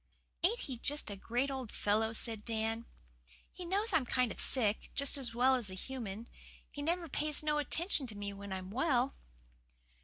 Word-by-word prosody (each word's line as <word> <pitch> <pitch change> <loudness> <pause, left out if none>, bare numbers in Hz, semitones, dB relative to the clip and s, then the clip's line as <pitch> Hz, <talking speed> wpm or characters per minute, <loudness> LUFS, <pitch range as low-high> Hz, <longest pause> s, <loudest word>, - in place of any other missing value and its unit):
"Ain't 440 +8 +2
he 255 -4 -5
just 290 -4 +2
a - - -4
great 245 +7 -1
old 260 -4 -5
fellow?" 220 +2 +1
said 225 -1 -3
Dan. 225 0 -2 0.6
"He 360 - -8
knows 400 +6 0
I'm 265 -6 +2
kind 250 -3 +1
of - - -1
sick, 220 -5 +2
just 280 +1 +5
as 250 -5 0
well 255 +2 +5
as 245 -6 +1
a 185 - -6
human. 230 -1 -6 0.4
He 290 - -6
never 335 +3 -1
pays 300 +1 +1
no 300 -1 +1
attention 300 0 +2
to 210 -3 -8
me 200 0 -4
when 200 0 -8
I'm 190 0 -5
well." 260 +1 +1
250 Hz, 185 wpm, -34 LUFS, 220-290 Hz, 0.6 s, just